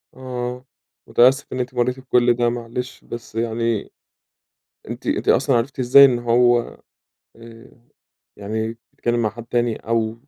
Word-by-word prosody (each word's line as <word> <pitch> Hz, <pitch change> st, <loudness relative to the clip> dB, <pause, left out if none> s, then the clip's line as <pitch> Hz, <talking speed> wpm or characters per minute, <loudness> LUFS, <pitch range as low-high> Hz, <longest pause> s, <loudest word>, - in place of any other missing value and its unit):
آه، 125 Hz, 0 st, -6 dB, 0.4 s
متأسف 130 Hz, +3 st, +4 dB
إن 130 Hz, -, -4 dB
أنتِ 125 Hz, +1 st, -3 dB
مريتِ 125 Hz, +1 st, -1 dB
بكل 125 Hz, -2 st, +2 dB
ده 120 Hz, 0 st, +1 dB
معلش، 120 Hz, +1 st, -6 dB
بس 115 Hz, -1 st, -9 dB
يعني 115 Hz, -1 st, -2 dB, 1.0 s
أنتِ -, -, -7 dB
أنتِ -, -, -1 dB
أصلًا 135 Hz, -1 st, +3 dB
عرفتِ 130 Hz, +3 st, -3 dB
إزاي 130 Hz, +3 st, +8 dB
إن 125 Hz, -3 st, +2 dB
هو 120 Hz, 0 st, +3 dB, 0.8 s
آآ 115 Hz, +2 st, -14 dB, 0.7 s
يعني 110 Hz, +2 st, -4 dB, 0.2 s
اتكلم 120 Hz, 0 st, -1 dB
مع 110 Hz, -, 0 dB
حد 115 Hz, +2 st, -10 dB
تاني 120 Hz, -1 st, 0 dB
أو 115 Hz, -1 st, -1 dB
120 Hz, 140 wpm, -21 LUFS, 115-125 Hz, 1.0 s, إزاي